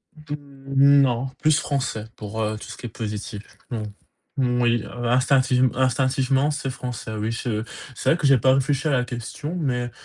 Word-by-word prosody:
Mmh, 140 Hz, -2 st, +2 dB
non, 125 Hz, -1 st, +2 dB
plus 155 Hz, +1 st, +4 dB
français 130 Hz, -8 st, -2 dB
pour, 105 Hz, +1 st, -5 dB
heu, 110 Hz, 0 st, -1 dB
tout -, -, -9 dB
ce -, -, -7 dB
qui 120 Hz, -, -6 dB
est -, -, -8 dB
positif, 105 Hz, -1 st, -5 dB, 0.3 s
non, 115 Hz, -3 st, -3 dB, 0.5 s
moui, 125 Hz, -3 st, +2 dB
heu, 120 Hz, 0 st, -6 dB
instinctive 130 Hz, 0 st, +4 dB
instinctivement, 130 Hz, +2 st, +2 dB
c'est 145 Hz, -3 st, -2 dB
français, 125 Hz, -3 st, -6 dB
oui, 110 Hz, +1 st, -2 dB
ce 115 Hz, -2 st, -2 dB, 0.3 s
c'est -, -, -1 dB
vrai 165 Hz, -, +4 dB
que 160 Hz, -, -2 dB
j'ai 135 Hz, -2 st, +6 dB
pas 130 Hz, +3 st, +5 dB
réfléchi 135 Hz, +3 st, +1 dB
à -, -, +2 dB
la 125 Hz, -2 st, +2 dB
question 125 Hz, +7 st, -5 dB
mais 125 Hz, -5 st, -1 dB
130 Hz, 180 wpm, -24 LUFS, 120-140 Hz, 0.5 s, j'ai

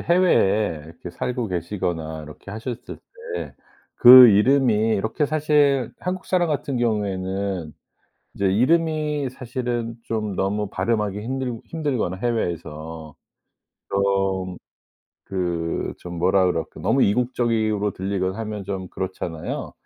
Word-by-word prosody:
해외에 105 Hz, -, +2 dB
이렇게 85 Hz, +2 st, -10 dB
살고 125 Hz, 0 st, -3 dB
계시거나 85 Hz, -3 st, -3 dB
이렇게 75 Hz, +6 st, -11 dB
하셨을 115 Hz, +3 st, -6 dB
때 465 Hz, -1 st, -8 dB, 0.4 s
그 125 Hz, +1 st, +11 dB
이름이 120 Hz, +3 st, +4 dB, 0.2 s
이렇게 110 Hz, +9 st, -1 dB
사실 145 Hz, -4 st, +2 dB
한국 180 Hz, +1 st, -4 dB
사람 175 Hz, -2 st, +1 dB
같은 140 Hz, -2 st, -2 dB
경우에는 100 Hz, -6 st, -2 dB, 0.6 s
이제 100 Hz, -, -1 dB
이름이 150 Hz, -, +1 dB
사실은 120 Hz, -2 st, -4 dB
좀 105 Hz, -4 st, -3 dB
너무 100 Hz, +1 st, -1 dB
발음하기 105 Hz, -3 st, -1 dB
힘들 125 Hz, -1 st, -3 dB
힘들거나 135 Hz, -, -2 dB
해외에서 80 Hz, -, -4 dB, 0.7 s
좀 95 Hz, -2 st, 0 dB, 0.7 s
그 85 Hz, -3 st, -2 dB
좀 85 Hz, -1 st, -7 dB
뭐라 95 Hz, +2 st, +3 dB
그럴까 85 Hz, -2 st, -2 dB
너무 -, -, +2 dB
이국적으로 110 Hz, -3 st, +1 dB
들리거나 95 Hz, 0 st, -2 dB
하면 105 Hz, -2 st, -5 dB
좀 95 Hz, -1 st, -5 dB
그렇잖아요. 90 Hz, -4 st, -5 dB
105 Hz, 270 characters per minute, -23 LUFS, 95-125 Hz, 0.7 s, 그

